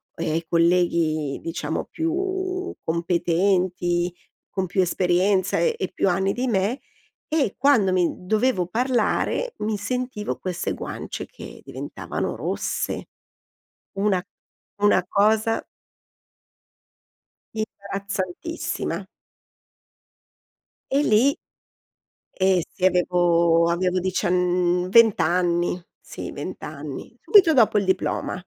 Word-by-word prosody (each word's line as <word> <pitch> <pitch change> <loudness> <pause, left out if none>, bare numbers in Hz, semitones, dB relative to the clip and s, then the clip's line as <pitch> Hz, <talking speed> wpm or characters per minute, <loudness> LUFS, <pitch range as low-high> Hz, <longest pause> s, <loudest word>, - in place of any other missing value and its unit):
ehm, 165 0 -1
colleghi 170 -4 +2
diciamo 165 0 -3
più 370 +3 -2
competenti, 175 +1 +1 0.4
con 190 -1 -2
più 185 +2 +1
esperienza 185 +2 +2
e 170 - +2
e 190 - -2
più 195 - +1
anni 190 +2 +1
di 250 +2 -2
me 215 +3 0 0.5
e 300 -10 +1
quando 250 -8 +4
mi 180 -2 +3 0.2
dovevo 215 -2 +1
parlare, 250 - 0
mi 210 0 -1
sentivo 250 0 -3
queste 180 -2 -3
guance - - -6
che - - -12
diventavano - - -5
rosse. - - -3 0.9
Una 195 -2 +1 0.6
una 205 -3 +3
cosa 220 +2 +2 1.9
imbarazzantissima. 200 - -4 1.8
E 280 +2 +3
lì 250 +4 +3 1.0
Ehm, 190 -1 +4
sì, 185 - -4
avevo 170 -2 +3
avevo 180 +1 +1
diciann 180 -1 +1
20 225 -1 +6
anni, 175 +1 +1 0.2
sì - - -7
20 - - -7
anni, - - -7
subito 375 -7 +6
dopo 225 -6 +4
il 200 - 0
diploma. 190 -1 -1
190 Hz, 95 wpm, -23 LUFS, 175-220 Hz, 1.9 s, 20